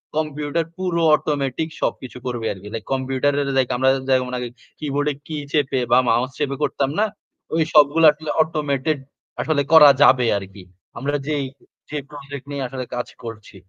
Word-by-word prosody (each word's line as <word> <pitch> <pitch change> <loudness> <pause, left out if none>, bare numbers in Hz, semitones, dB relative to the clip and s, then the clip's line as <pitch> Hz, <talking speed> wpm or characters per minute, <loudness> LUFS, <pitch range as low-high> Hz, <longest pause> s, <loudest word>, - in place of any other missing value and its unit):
Computer 150 +1 -1
পুরো 180 -2 -1
automatic 145 0 -2
সবকিছু 125 -1 -3
করবে 120 -3 -3
আরকি। 95 +1 -12
লাইক 115 - -4
কম্পিউটারের 135 +2 0
লাইক 130 -2 +2
আমরা 130 +1 +3 0.2
যেমন 130 -1 +2
আগে 125 0 -3 0.3
কিবোর্ডে 145 0 -1
কী 155 - -4
চেপে 140 -3 +1
বা 120 - +7
মাউস 120 +3 +2
চেপে 140 -2 -1
করতাম 140 -1 0
না? 215 - +4 0.5
ওই 165 - +3
সবগুলো 150 +2 +6
আসলে 150 +1 -9
অটোমেটেড 150 -2 0 0.4
আসলে 155 -3 +1
করা 155 -3 +10
যাবে 130 -3 +6
আরকি। 95 -1 -9 0.3
আমরা 145 +3 -2
যেই 145 -3 0 0.4
যে 150 - -4
প্রজেক্ট 140 -1 -9
নিয়ে 140 -1 -3
আসলে 130 0 -5
কাজ 125 0 -3 0.2
করছি। 110 -3 -9
140 Hz, 160 wpm, -21 LUFS, 130-150 Hz, 0.5 s, করা